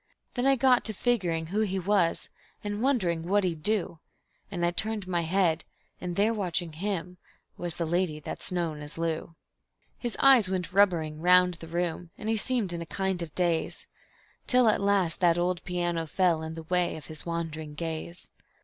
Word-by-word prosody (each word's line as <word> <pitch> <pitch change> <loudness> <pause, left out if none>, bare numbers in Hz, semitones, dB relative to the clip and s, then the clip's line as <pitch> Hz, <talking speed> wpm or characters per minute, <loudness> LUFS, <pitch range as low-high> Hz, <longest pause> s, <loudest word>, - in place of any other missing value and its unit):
Then 250 +1 0
I 275 - +5
got 255 -1 +4
to 220 - -1
figgering 180 -8 0
who 210 - +1
he 195 -3 0
was, 190 -2 +1 0.4
and 205 +1 -3
wondering 200 -11 +1
what 195 +5 +1
he'd 170 -4 -2
do, 195 -4 0 0.5
And 175 -4 -1
I 175 - +2
turned 215 +2 0
my 175 -2 0
head 170 -1 +1 0.4
and 175 -1 -4
there 210 +4 +3
watching 175 -5 -1
him 180 0 -3 0.4
was 175 -1 -1
the 170 - -2
lady 170 -2 0
that's 150 - -4
known 165 -4 -2
as 150 +2 -9
Lou. 165 0 -3 0.6
His 240 -2 -3
eyes 260 -8 +6
went 180 -2 -3
rubbering 165 -6 +2
round 180 +1 +6
the 165 - -9
room, 170 0 -2
and 220 - -4
he 225 - +2
seemed 215 -5 0
in 170 - -4
a - - -5
kind 190 -1 -1
of 160 -3 -6
daze, 170 -3 0 0.6
Till 250 -2 +5
at 215 - +1
last 200 -4 +2
that 175 -2 +4
old 175 0 0
piano 175 -2 -1
fell 175 -1 +2
in 160 0 -5
the 165 - -7
way 180 +1 0
of 150 - -10
his 155 +2 -10
wandering 160 -3 -4
gaze. 165 +2 -5
175 Hz, 185 wpm, -28 LUFS, 165-200 Hz, 0.6 s, eyes